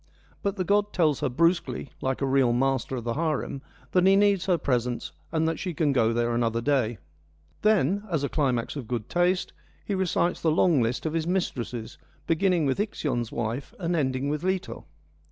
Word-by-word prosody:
But 200 Hz, 0 st, -1 dB
the 190 Hz, -, -1 dB
god 205 Hz, +3 st, +1 dB
tells 155 Hz, -6 st, +2 dB
her -, -, 0 dB
brusquely, 165 Hz, -1 st, 0 dB
like 130 Hz, 0 st, -1 dB
a -, -, +2 dB
real 135 Hz, -3 st, +3 dB
master 135 Hz, +1 st, 0 dB
of 120 Hz, -, -4 dB
the 115 Hz, 0 st, -1 dB
harem, 155 Hz, -2 st, -2 dB, 0.3 s
that 180 Hz, 0 st, +4 dB
he 195 Hz, -, +6 dB
needs 200 Hz, -2 st, +3 dB
her 180 Hz, -2 st, +3 dB
presence 125 Hz, -4 st, -1 dB, 0.2 s
and 160 Hz, 0 st, +1 dB
that 165 Hz, -1 st, -1 dB
she 180 Hz, -4 st, -4 dB
can 150 Hz, -4 st, +2 dB
go 115 Hz, -3 st, +3 dB
there 120 Hz, 0 st, 0 dB
another 115 Hz, -1 st, +1 dB
day: 120 Hz, -3 st, +1 dB, 0.6 s
then, 205 Hz, -2 st, +2 dB
as 160 Hz, -5 st, 0 dB
a -, -, +1 dB
climax 130 Hz, -6 st, 0 dB
of 135 Hz, -6 st, -6 dB
good 115 Hz, -3 st, -3 dB
taste, 180 Hz, +1 st, +1 dB, 0.3 s
he 205 Hz, -, -2 dB
recites 180 Hz, -2 st, 0 dB
the 165 Hz, -, +2 dB
long 155 Hz, -2 st, +3 dB
list 120 Hz, +4 st, -1 dB
of 160 Hz, -, -1 dB
his 165 Hz, 0 st, -1 dB
mistresses, 125 Hz, -10 st, -3 dB, 0.3 s
beginning 170 Hz, -1 st, +2 dB
with 135 Hz, +3 st, 0 dB
Ixion's 135 Hz, -, -2 dB
wife 120 Hz, +4 st, -4 dB
and 175 Hz, -2 st, -1 dB
ending 135 Hz, -3 st, 0 dB
with 150 Hz, +1 st, -1 dB
Leto. 185 Hz, +1 st, -2 dB
150 Hz, 190 wpm, -26 LUFS, 125-180 Hz, 0.6 s, he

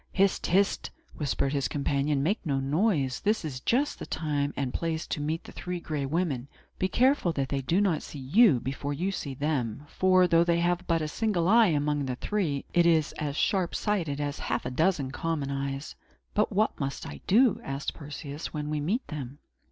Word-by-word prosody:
"Hist! 195 Hz, 0 st, +2 dB
hist!" 195 Hz, +3 st, +2 dB, 0.2 s
whispered 140 Hz, -1 st, -1 dB
his 140 Hz, -3 st, +1 dB
companion. 140 Hz, 0 st, 0 dB
"Make 200 Hz, +9 st, 0 dB
no 140 Hz, -5 st, 0 dB
noise! 140 Hz, -, +1 dB
This 210 Hz, -3 st, 0 dB
is 135 Hz, -5 st, -4 dB
just 270 Hz, -, 0 dB
the -, -, -5 dB
time 145 Hz, -3 st, -1 dB
and 130 Hz, -2 st, -2 dB
place 165 Hz, -1 st, -2 dB
to 150 Hz, -, -3 dB
meet 155 Hz, +3 st, -2 dB
the -, -, -11 dB
Three 180 Hz, 0 st, -5 dB
Gray 150 Hz, -4 st, -3 dB
Women. 145 Hz, -5 st, -1 dB, 0.3 s
Be 185 Hz, -, +2 dB
careful 255 Hz, -2 st, +3 dB
that 135 Hz, -3 st, -1 dB
they 140 Hz, -1 st, -1 dB
do 165 Hz, +8 st, +1 dB
not 190 Hz, -7 st, +2 dB
see -, -, -9 dB
you 145 Hz, -, +5 dB
before 135 Hz, +3 st, -3 dB
you 180 Hz, +7 st, -1 dB
see 145 Hz, -7 st, -5 dB
them; 140 Hz, -3 st, -2 dB
for, 185 Hz, +3 st, +4 dB
though 170 Hz, -1 st, +4 dB
they 170 Hz, 0 st, +2 dB
have 175 Hz, +1 st, 0 dB
but 165 Hz, -2 st, +1 dB
a -, -, -1 dB
single 180 Hz, 0 st, 0 dB
eye 225 Hz, +2 st, +6 dB
among 145 Hz, -3 st, +1 dB
the 125 Hz, -, -2 dB
three, 160 Hz, -4 st, -1 dB
it 175 Hz, -1 st, +5 dB
is 160 Hz, -3 st, +3 dB
as 145 Hz, -2 st, -2 dB
sharp 185 Hz, +1 st, +1 dB
sighted 170 Hz, -9 st, -1 dB
as 145 Hz, 0 st, -3 dB
half -, -, -2 dB
a -, -, -2 dB
dozen 150 Hz, -2 st, +1 dB
common 150 Hz, -3 st, -2 dB
eyes." 135 Hz, +1 st, -3 dB, 0.4 s
"But 210 Hz, -, +2 dB
what 215 Hz, +2 st, +1 dB
must 135 Hz, -1 st, -3 dB
I 70 Hz, -2 st, -8 dB
do," 235 Hz, +3 st, +4 dB
asked 135 Hz, +1 st, -3 dB
Perseus, 145 Hz, 0 st, -7 dB
"when 150 Hz, -1 st, -4 dB
we 150 Hz, -, 0 dB
meet 195 Hz, -, -1 dB
them?" 140 Hz, -2 st, -6 dB
155 Hz, 200 wpm, -28 LUFS, 140-185 Hz, 0.4 s, eye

